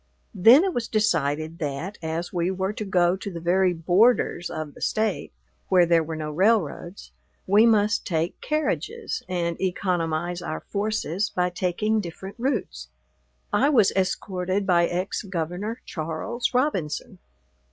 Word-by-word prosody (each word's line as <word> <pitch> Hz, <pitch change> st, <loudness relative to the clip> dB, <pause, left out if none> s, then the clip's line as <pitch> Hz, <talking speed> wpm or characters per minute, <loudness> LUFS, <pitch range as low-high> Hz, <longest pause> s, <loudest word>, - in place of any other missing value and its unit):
Then 225 Hz, -, +7 dB
it 385 Hz, -2 st, 0 dB
was 235 Hz, -2 st, -2 dB
decided 165 Hz, -7 st, 0 dB
that, 155 Hz, +7 st, -4 dB
as 165 Hz, +2 st, -4 dB
we 175 Hz, 0 st, 0 dB
were 190 Hz, +1 st, -2 dB
to 215 Hz, -, -5 dB
go 180 Hz, -2 st, +2 dB
to 195 Hz, +1 st, -6 dB
the 170 Hz, -, -6 dB
very 180 Hz, +2 st, +2 dB
borders 175 Hz, +2 st, +2 dB
of 155 Hz, -3 st, -5 dB
the -, -, -15 dB
State, 215 Hz, -2 st, -1 dB, 0.4 s
where 180 Hz, -2 st, +5 dB
there 170 Hz, -1 st, +4 dB
were 160 Hz, +1 st, -5 dB
no 155 Hz, -1 st, -4 dB
railroads, 185 Hz, 0 st, 0 dB, 0.3 s
we 210 Hz, +4 st, +5 dB
must 215 Hz, 0 st, +3 dB
take 165 Hz, -2 st, -2 dB
carriages, 440 Hz, +9 st, -2 dB
and 170 Hz, -2 st, -2 dB
economize 175 Hz, -2 st, -1 dB
our 155 Hz, -2 st, -4 dB
forces 205 Hz, -2 st, -2 dB
by 180 Hz, 0 st, 0 dB
taking 185 Hz, +5 st, 0 dB
different 190 Hz, +3 st, -8 dB
routes. 220 Hz, -, -2 dB, 0.7 s
I 280 Hz, -, +4 dB
was 225 Hz, -9 st, +4 dB
escorted 190 Hz, 0 st, -1 dB
by 170 Hz, -2 st, +3 dB
ex 180 Hz, +2 st, -2 dB
Governor 190 Hz, +4 st, -4 dB
Charles 165 Hz, +9 st, -3 dB
Robinson. 245 Hz, -, -1 dB
185 Hz, 140 wpm, -25 LUFS, 170-215 Hz, 0.7 s, Then